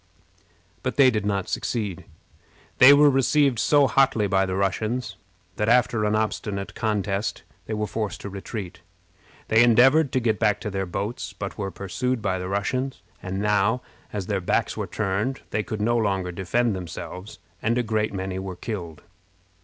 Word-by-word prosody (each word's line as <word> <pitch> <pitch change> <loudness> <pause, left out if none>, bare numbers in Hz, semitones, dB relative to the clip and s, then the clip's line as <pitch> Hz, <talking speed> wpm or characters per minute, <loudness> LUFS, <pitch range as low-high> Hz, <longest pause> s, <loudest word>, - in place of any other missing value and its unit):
But 130 - -2
they 135 -2 +6
did 105 -3 -1
not 100 -2 -1
succeed. 105 -7 -3 0.7
They 130 +2 +10
were 145 +1 +7
received 135 -1 +2
so 145 +5 +4
hotly 135 -6 +3
by 95 -1 +2
the 95 - -2
Russians 110 +6 -1 0.4
that, 105 +1 +1
after 120 -2 +3
an 105 0 +1
obstinate 105 -2 -2
contest, 105 -2 -2 0.2
they 110 - -2
were 105 0 -1
forced 105 -1 -3
to 100 - -6
retreat. 95 -2 -7 0.7
They 110 +1 +5
endeavored 130 +6 +5
to 130 - +3
get 115 -3 0
back 105 -2 +2
to 105 - -4
their 95 -1 -2
boats, 100 +1 -4
but 100 +1 -6
were 100 -1 -2
pursued 110 +7 -2
by 95 -3 -1
the 90 0 -4
Russians; 130 +7 -2 0.2
and 95 +1 -4
now, 105 +4 +2 0.3
as 100 -3 -4
their 100 -1 -1
backs 90 - 0
were - - -3
turned, 105 +6 -2
they 110 - 0
could 110 -1 -5
no 120 +2 +2
longer 95 -5 0
defend 100 +6 0
themselves, 90 +2 -7 0.2
and 115 +2 +1
a 125 - +1
great 110 -1 0
many 95 -1 -4
were 95 -1 -5
killed. 90 -7 -6
105 Hz, 170 wpm, -24 LUFS, 95-120 Hz, 0.7 s, They